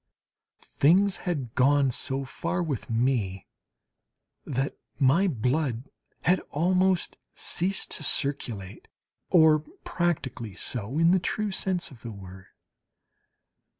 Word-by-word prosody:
Things 185 +7 +3
had 135 -9 -3
gone 140 +1 +4
so 135 +2 -2
far 175 +6 -2
with 145 -9 -4
me 115 -5 0 1.0
that 135 0 -2 0.2
my 145 +8 +4
blood 130 - -1 0.3
had 180 +1 +4
almost 185 +3 +1 0.2
ceased 190 +3 -2
to - - -3
circulate, 110 -9 -2 0.4
or 160 -3 +6 0.2
practically 135 - -2
so 120 +3 -4
in 165 +1 +5
the 185 - +4
true 210 +3 -2
sense 185 -3 -2
of 125 - -14
the 120 - -7
word. 95 -2 -11
140 Hz, 110 wpm, -27 LUFS, 120-175 Hz, 1.0 s, or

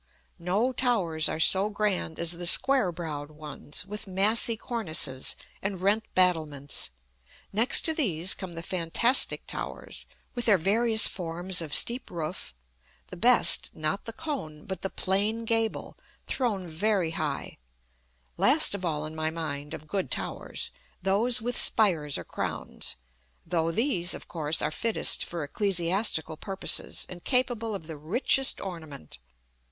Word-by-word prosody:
No 200 +9 0
towers 185 -12 +1
are - - -4
so 190 +5 +4
grand 200 -6 -2
as 170 0 +3
the 175 0 -4
square 260 -1 +3
browed 155 -4 -6
ones, 150 +1 -5
with 210 +1 -7
massy 215 +4 +3
cornices 170 - -1 0.3
and 195 -1 -3
rent 205 +4 +1
battlements: 155 - +1 0.6
next 230 +6 +4
to 320 - 0
these 185 - +1
come 185 -2 -7
the 165 0 -6
fantastic 185 +9 +3
towers, - - -6 0.3
with 240 -1 -3
their 210 -4 +5
various 220 +5 +4
forms 175 0 0
of 160 -3 -6
steep 240 - +2
roof; 160 - -5 0.6
the - - -6
best, 240 +7 +6
not 155 +5 -2
the 230 - -4
cone, 230 - -6
but 190 -2 -6
the 195 - -2
plain 210 +6 0
gable 225 -1 -1 0.3
thrown 210 -8 -2
very 175 +1 0
high; - - -4 0.8
last 290 0 +4
of 200 -2 -5
all 155 -3 -2
in 155 - -6
my 155 0 -1
mind 150 -3 -5
(of 155 - -12
good 195 +3 -2
towers), - - -3 0.3
those 220 +5 +2
with 245 +1 -1
spires 165 -10 +3
or - - -6
crowns, - - -4 0.5
though 165 -1 0
these, 185 - +1
of - - -10
course, 155 -1 -1
are 150 - 0
fittest 225 +7 +1
for 170 -2 -5
ecclesiastical 175 -1 0
purposes, 195 +3 -1
and 175 -1 -10
capable 240 -4 0
of 165 - -7
the 160 -1 -8
richest 240 - +2
ornament. 160 - -8
185 Hz, 145 wpm, -27 LUFS, 160-220 Hz, 0.8 s, best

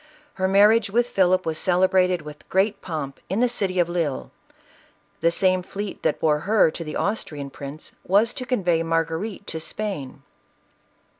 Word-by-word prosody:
Her 190 0 0
marriage 205 +3 +5
with 240 +4 +1
Philip 185 -1 +3
was 160 -1 -2
celebrated 185 -1 +2
with 150 0 -11
great 195 +3 +1
pomp 150 -6 -5
in 195 +4 0
the 250 - +4
city 195 -6 -1
of 175 -1 +3
Lisle. 170 -6 -2 0.9
The 170 - +3
same 185 +2 +2
fleet 200 +2 -6
that - - 0
bore 150 -2 +2
her 200 -1 +3
to 165 - -6
the 155 - -6
Austrian 150 -9 -3
prince, 140 +3 -8
was 210 +5 +3
to 255 -2 -6
convey 180 -10 +1
Margarite 165 +5 -2
to 160 - -5
Spain. 160 -7 -5
185 Hz, 160 wpm, -23 LUFS, 160-200 Hz, 0.9 s, marriage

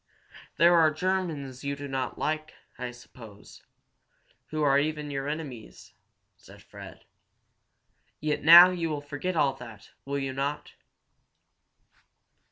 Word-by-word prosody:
"There 170 +2 +5
are 165 -2 +5
Germans 155 -6 -3
you 140 0 -3
do 140 0 -8
not 135 -1 -4
like, 155 +1 -3 0.2
I 125 0 -4
suppose 115 -3 -15 0.9
who 155 -1 -3
are 140 -1 +4
even 150 0 -3
your 135 0 -4
enemies," 145 -7 -8 0.4
said - - -17
Fred. - - -13 1.1
"Yet 150 0 -2
now 170 +3 +10
you 170 -2 -3
will 150 -2 -4
forget 145 +5 -5
all 140 -4 +2
that, 115 -5 -13
will 140 +1 -3
you 135 -1 -3
not?" 140 +2 -4
145 Hz, 125 wpm, -27 LUFS, 135-155 Hz, 1.1 s, now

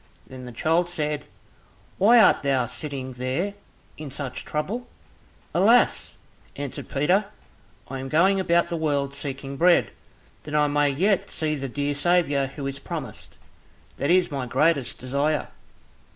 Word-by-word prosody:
Then 130 -1 -10
the 125 - -8
child 165 +8 +1
said, 150 -3 -2 0.7
"Why 230 +5 +7
art 210 - +5
thou 135 -3 +1
sitting 130 -1 -5
there 130 +11 -2 0.5
in 150 -2 -6
such 135 -1 -5
trouble?" 205 +12 -3 0.7
"Alas!" 220 +8 +3 0.4
answered 140 -2 -6
Peter, 180 +9 +2 0.6
"I 135 0 -5
am 135 0 -6
going 190 +6 +3
about 170 -2 +2
the 170 - -2
world 140 -3 -1
seeking 140 -1 -6
bread, 175 +2 +4 0.5
that 150 - -6
I 150 0 +4
may 145 0 +2
yet 185 +8 +1
see 155 -1 -1
the 135 -2 -4
dear 145 +3 -1
Saviour 145 -3 +2
who 135 +1 -7
is 135 0 -4
promised, - - -7 0.6
that 140 - -1
is 180 -1 +3
my 135 -3 -3
greatest 135 +1 +1
desire." 140 +4 -1
145 Hz, 145 wpm, -24 LUFS, 135-170 Hz, 0.7 s, Why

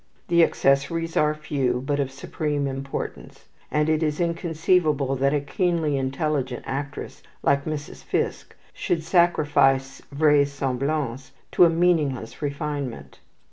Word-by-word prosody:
The 170 -1 +5
accessories 165 +4 +1
are 150 0 +3
few, 135 -5 -1
but 145 0 0
of 140 -2 0
supreme 145 +1 -3
importance; 135 0 -6 0.2
and 150 0 +1
it 155 0 +2
is 150 -2 0
inconceivable 165 -4 +1
that 135 +1 +2
a 145 - +2
keenly 160 +1 0
intelligent 135 -1 -2
actress 140 +1 -5 0.2
like 140 0 +2
Mrs. 150 -2 -5
Fiske - - -2 0.2
should 165 -2 -1
sacrifice 145 -6 +2
vraisemblance 140 -2 0 0.2
to 180 - +6
a - - +5
meaningless 160 -8 0
refinement. 140 - -4
145 Hz, 120 wpm, -24 LUFS, 135-155 Hz, 0.2 s, to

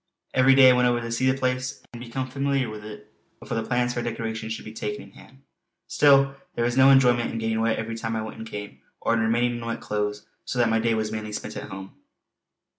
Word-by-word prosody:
Every 130 +1 +5
day 130 -1 +8
I - - +5
went 125 0 +3
over 120 0 +2
to 115 0 -5
see 130 +3 +1
the 130 - +1
place 130 -1 -2
and 120 - -9
become 130 +2 -4
familiar 135 -2 -1
with 105 -1 -8
it 105 0 -11 0.3
before - - -5
the 115 - 0
plans 120 -1 0
for 120 - -2
decoration 110 -1 -4
should 110 - -5
be 110 - -8
taken 105 -1 -4
in 100 - -16
hand. 135 +6 -18 0.4
Still 140 -1 +4 0.2
there 120 - 0
was 120 0 0
no 130 +1 +7
enjoyment 125 -3 +4
in - - -4
getting 110 0 -1
wet 115 0 +1
every 115 0 -4
time 115 0 -3
I 110 - -2
went 110 0 -8
and 110 - -7
came, 105 0 -7 0.2
or - - 0
in 115 - +2
remaining 120 +2 +1
in 115 - -7
wet 115 - -3
clothes, 105 0 -3 0.2
so - - -5
that 120 -2 +3
my 115 0 +2
day 115 0 +1
was 110 -1 -2
mainly 110 -1 -5
spent - - -6
at - - -7
home. 95 0 -9
115 Hz, 250 wpm, -25 LUFS, 110-130 Hz, 0.4 s, day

